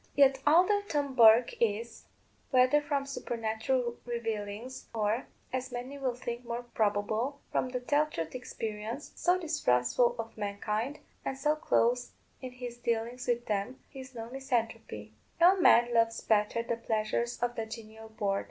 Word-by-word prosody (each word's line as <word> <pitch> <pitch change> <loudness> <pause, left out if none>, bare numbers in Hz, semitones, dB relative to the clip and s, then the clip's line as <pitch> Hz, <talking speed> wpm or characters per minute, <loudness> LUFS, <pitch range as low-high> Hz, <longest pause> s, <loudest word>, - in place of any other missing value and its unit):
Yet, 270 -1 +5
although 365 +7 +5
Tom 285 -2 -1
Bourke 230 -1 +7
is, 230 +1 -1 0.4
whether 255 +3 +5
from 285 -1 -1
supernatural 235 -1 -2
revealings, 225 0 -4
or 215 +3 0 0.3
(as 255 0 -2
many 255 +3 -6
will 255 -3 -1
think 240 -1 -5
more 235 0 -4
probable) 220 +4 -1
from 255 - 0
the 250 0 -2
tell 290 +4 +2
truth 165 - -5
experience, 225 +1 -5
so 360 +1 +2
distrustful 240 - +2
of 230 0 -6
mankind, 210 +6 -2 0.3
and 270 - -3
so 300 +3 +2
close 245 -5 +1 0.3
in 255 -1 -7
his 245 -1 -7
dealings 235 +1 -2
with 240 0 0
them, 210 +5 -2
he 270 - -10
is 260 -1 -10
no 225 -1 -6
misanthrope. 230 - -3 0.3
No 355 +3 +7
man 240 -9 +5
loves 230 0 +3
better 215 +1 +2
the 235 0 -2
pleasures 225 +1 -1
of 240 0 -1
the 225 -2 -4
genial 220 0 -9
board. 200 -2 -1
240 Hz, 150 wpm, -30 LUFS, 220-260 Hz, 0.4 s, Bourke